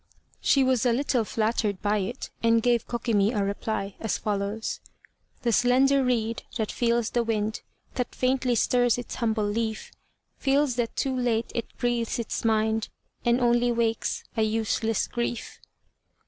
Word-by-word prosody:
She 275 - +3
was 255 -3 +2
a 245 - +3
little 255 -2 +1
flattered 215 -2 0
by 210 0 +2
it, 220 +7 -4
and 230 -1 +3
gave 240 -2 +2
Kokimi 225 -3 +1
a - - +2
reply, 200 0 -3
as 225 - -1
follows: 205 +1 -2 0.6
"The 235 - +2
slender 260 +4 +4
reed 230 -3 0 0.2
that 220 -2 -1
feels 235 -1 +1
the 240 - +2
wind 215 -1 -1 0.3
That 250 -2 -3
faintly 255 -1 +1
stirs 245 +1 +3
its 245 - -6
humble 220 -3 0
leaf, 220 +1 -2 0.5
Feels 275 -1 +2
that 235 -2 -1
too 265 -1 0
late 235 -3 0
it 235 - -2
breathes 240 -2 0
its 235 -2 -3
mind, 220 -1 +1 0.4
And 240 +1 +3
only 240 0 +3
wakes, 230 -1 0
a 225 - +1
useless 220 0 0
grief." 235 -1 -4
230 Hz, 150 wpm, -26 LUFS, 220-245 Hz, 0.6 s, slender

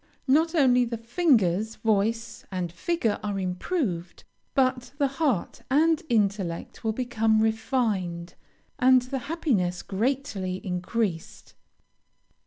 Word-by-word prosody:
Not 320 +5 +3
only 250 -5 +5
the 235 -1 -3
fingers, 225 - +2
voice, 225 +1 0
and 180 -3 -3
figure 225 - -1
are 205 -1 -3
improved, 185 - -3 0.3
but 255 -1 +1
the 285 - +2
heart 270 - -1
and 315 +3 +3
intellect 200 -6 -1
will 220 - +1
become 225 -2 +1
refined, 215 -6 -1 0.5
and 255 0 +5
the 265 +2 -4
happiness 215 - 0
greatly 205 -4 -2
increased. 180 -1 -3
225 Hz, 105 wpm, -26 LUFS, 190-260 Hz, 0.5 s, only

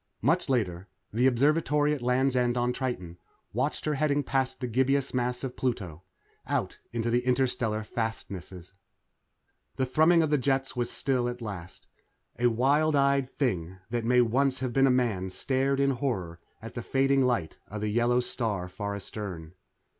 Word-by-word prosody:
Much 160 +5 +2
later, 95 -8 0 0.3
the 125 +4 +3
Observatory 145 +3 +3
at 145 - -4
Land's 130 +2 +2
End 125 -1 +2
on 120 0 +1
Triton 95 -10 -4 0.3
watched - - -1
her 155 - +1
heading 145 0 +1
past 130 -1 -1
the 130 - -3
gibbous 130 +3 +1
mass 125 0 -1
of 130 -2 -4
Pluto 95 -11 -3 0.5
out - - -2
into 115 0 -1
the 120 +1 +2
interstellar 125 -4 0
fastnesses. 95 -6 -5 1.0
The 130 - 0
thrumming 160 +6 +4
of 155 - -1
the 150 - +3
jets 135 +1 0
was 120 -1 -1
still 125 -3 0
at 120 0 -6
last. 95 -6 -8 0.5
A 120 - +4
wild 140 +6 +3
eyed 140 -1 +3
thing 95 - -1
that 120 -1 -1
may 125 +2 +4
once 130 +3 +2
have 130 -2 -2
been 135 +1 +5
a - - +4
man 115 -7 +1
stared 135 +7 0
in 140 0 +3
horror 105 -11 -2 0.2
at 115 - -8
the 120 - -4
fading 135 +2 +2
light 120 -11 0
of 105 0 -6
the 105 - -1
yellow 120 +3 +2
star 105 -7 -2
far 100 +3 -4
astern. 95 -5 -7
125 Hz, 170 wpm, -28 LUFS, 110-135 Hz, 1.0 s, been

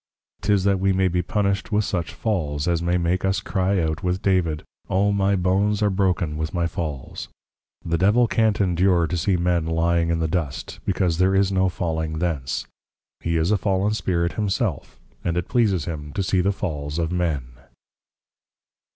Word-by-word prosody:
'Tis 100 -2 +2
that 100 -1 +2
we 95 +1 +2
may 95 0 +2
be 90 0 0
punished 100 +3 -1
with 105 -1 +2
such 85 -4 -2
Falls, 75 -9 -2
as 85 -1 +1
may 85 +1 +1
make 90 +1 0
us 95 0 +1
cry 95 0 0
out 80 0 -1
with 90 -1 0
David, 90 -6 +1 0.3
O 100 +2 +2
my 100 0 +2
Bones 100 +3 +1
are 105 - +3
broken 90 -5 0
with 80 +4 -3
my 85 -1 +1
Falls! 80 -5 -5 0.6
The 85 0 0
Devil 105 +6 +4
can't 110 -2 +2
endure 90 -2 +3
to 85 - -3
see 90 +2 +1
men 85 -2 +1
lying 85 +1 +1
in 85 - +1
the 80 0 0
Dust; 80 -4 -3
because 85 -3 0
there 95 +1 +3
is 100 0 +3
no 95 -1 +2
falling 80 -3 -2
thence. 75 -7 -2 0.5
He 85 0 -1
is 80 +5 +1
a 105 - +2
Fallen 100 +2 +1
Spirit 85 -5 0
himself, 105 - -2 0.2
and 85 0 -1
it 90 - -1
pleases 100 -9 +2
him 75 -3 -6
to 100 - -1
see 95 -1 +2
the 100 +2 +2
Falls 75 -5 -4
of 85 -1 -1
men. 80 -8 -1
90 Hz, 185 wpm, -23 LUFS, 85-95 Hz, 0.6 s, Devil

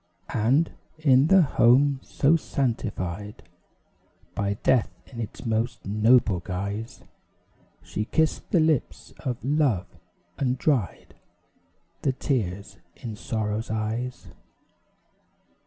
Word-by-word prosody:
And, 130 +9 +2 0.3
in 140 -2 +4
the 190 0 +6
home 135 +1 +4
so 145 +4 +2
sanctified 105 - -3 0.9
By 100 0 -1
death 125 -4 +3 0.2
in 120 - -11
its 110 +1 -6
most 115 +1 -1
noble 110 -1 +3
guise, 100 +5 -5 0.8
She 105 - -3
kissed 160 +6 0
the 175 - +3
lips 155 -4 0
of 125 -4 -3
love, 135 - +2 0.5
and 130 -2 +1
dried 125 - -1 0.9
The 135 - +1
tears 100 -8 -2 0.2
in 115 -3 -7
sorrow's 110 +1 -3
eyes. 110 +3 -3
115 Hz, 100 wpm, -26 LUFS, 105-135 Hz, 0.9 s, the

